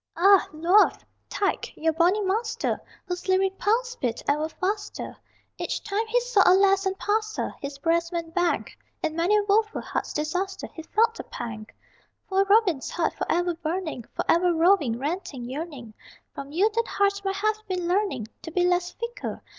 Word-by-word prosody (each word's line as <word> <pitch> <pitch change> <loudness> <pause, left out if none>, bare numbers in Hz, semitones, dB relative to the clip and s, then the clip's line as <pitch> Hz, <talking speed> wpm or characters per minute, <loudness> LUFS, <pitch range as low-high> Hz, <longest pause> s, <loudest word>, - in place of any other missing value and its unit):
Ah, 390 +2 +6
Luath, 340 +7 +3 0.2
tyke, 395 - -2
your 320 0 +1
bonny 355 +6 +3
master 440 +4 -1 0.2
Whose 360 0 -5
lyric 380 +1 +2
pulse 480 +3 +1
beat 240 -3 -2
ever 300 +2 +1
faster 400 +6 -3 0.4
Each - - -3
time 425 +2 -1
he 480 +2 +3
saw 485 -4 +3
a 370 - +6
lass 390 0 +4
and 385 0 -2
passed 430 +2 -1
her - - -2
His 280 0 -5
breast 335 +3 +1
went 335 -2 -4
bang! 355 -1 +1 0.4
In 310 - -1
many 350 +6 +3
a 415 - +2
woful 425 +2 +2
heart's - - -3
disaster 365 +6 -2
He 320 - -7
felt 450 +7 +2
the - - -7
pang! 220 -3 -6 0.6
Poor 390 0 +3
Robin's 395 -8 +3
heart, 335 -2 0
forever 350 0 0
burning, 325 -4 -3
Forever 350 +1 +3
roving, 325 -8 +3
ranting, 290 -2 -4
yearning, 265 -4 -6 0.4
From 280 0 -8
you 390 +8 +2
that 460 +1 0
heart 400 0 +1
might 390 0 -1
have 430 +2 +1
been 365 -2 -2
learning 370 - 0 0.2
To - - -7
be 355 +2 +1
less 355 0 +2
fickle! 470 +1 -5
365 Hz, 170 wpm, -26 LUFS, 325-405 Hz, 0.6 s, Ah